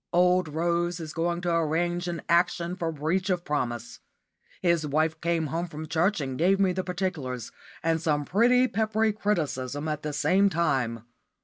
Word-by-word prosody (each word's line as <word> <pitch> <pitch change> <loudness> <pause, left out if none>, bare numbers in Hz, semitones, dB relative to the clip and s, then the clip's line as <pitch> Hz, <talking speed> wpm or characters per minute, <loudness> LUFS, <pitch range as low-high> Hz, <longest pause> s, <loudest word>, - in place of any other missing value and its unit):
Old 180 0 +4
Rose 170 +2 0
is 155 -2 -6
going 170 +1 -1
to 175 -1 -1
arrange 175 +2 0
an 170 -1 -4
action 170 +1 +2
for 165 -3 -2
breach 165 +6 -1
of 180 -2 0
promise. 120 -6 -3 0.6
His 170 -3 +3
wife 155 +2 0
came 170 -1 0
home 170 +2 -1
from 155 -1 -7
church 175 +6 +1
and 130 -2 -4
gave 190 +4 +3
me 195 -2 +3
the 185 +1 -2
particulars, 175 - -3 0.3
and 165 -1 +1
some 150 -3 0
pretty 245 - +4
peppery 220 0 +1
criticism 150 -9 -2
at 150 -1 -2
the 150 - -3
same 180 +7 +3
time. 130 - 0
170 Hz, 170 wpm, -27 LUFS, 150-180 Hz, 0.6 s, Old